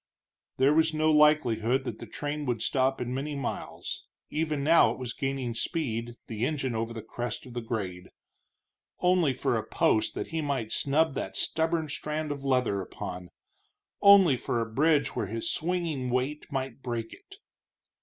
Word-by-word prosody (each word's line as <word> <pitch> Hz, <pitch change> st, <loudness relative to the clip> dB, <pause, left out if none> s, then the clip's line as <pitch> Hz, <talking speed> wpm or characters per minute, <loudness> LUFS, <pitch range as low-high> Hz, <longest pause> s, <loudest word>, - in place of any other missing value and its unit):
There 135 Hz, +3 st, +4 dB
was 160 Hz, 0 st, +3 dB
no 155 Hz, 0 st, +3 dB
likelihood 135 Hz, -5 st, +4 dB
that -, -, -5 dB
the -, -, -8 dB
train 145 Hz, 0 st, -4 dB
would 120 Hz, -3 st, -1 dB
stop 135 Hz, 0 st, +1 dB
in 125 Hz, 0 st, -3 dB
many 145 Hz, +3 st, -3 dB
miles 140 Hz, -3 st, -5 dB, 0.2 s
even 155 Hz, -2 st, -1 dB
now 165 Hz, +3 st, +6 dB
it -, -, -5 dB
was 125 Hz, -2 st, -4 dB
gaining 135 Hz, -4 st, -2 dB
speed, 120 Hz, -3 st, -2 dB
the 110 Hz, -1 st, -4 dB
engine 135 Hz, -2 st, -1 dB
over 115 Hz, +1 st, -2 dB
the 115 Hz, -2 st, -6 dB
crest 120 Hz, +2 st, -5 dB
of 125 Hz, -, -11 dB
the 120 Hz, -, -3 dB
grade. 95 Hz, -6 st, -4 dB, 0.9 s
Only 180 Hz, -5 st, +3 dB
for 130 Hz, -, 0 dB
a -, -, -2 dB
post 110 Hz, 0 st, +1 dB
that -, -, -4 dB
he 160 Hz, -1 st, -2 dB
might 135 Hz, -7 st, -2 dB
snub 150 Hz, +2 st, +2 dB
that -, -, -4 dB
stubborn 160 Hz, 0 st, 0 dB
strand 150 Hz, +1 st, -3 dB
of 140 Hz, -1 st, -5 dB
leather 125 Hz, -7 st, +1 dB
upon! 90 Hz, -1 st, -7 dB, 0.7 s
only 195 Hz, -9 st, +7 dB
for 120 Hz, -, -1 dB
a 115 Hz, -, 0 dB
bridge 150 Hz, +1 st, +3 dB
where 100 Hz, -, -1 dB
his 115 Hz, -, -2 dB
swinging 165 Hz, -6 st, -1 dB
weight 130 Hz, +4 st, -1 dB
might 135 Hz, -2 st, -3 dB
break 120 Hz, -3 st, -4 dB
it! -, -, -14 dB
135 Hz, 170 wpm, -28 LUFS, 120-155 Hz, 0.9 s, only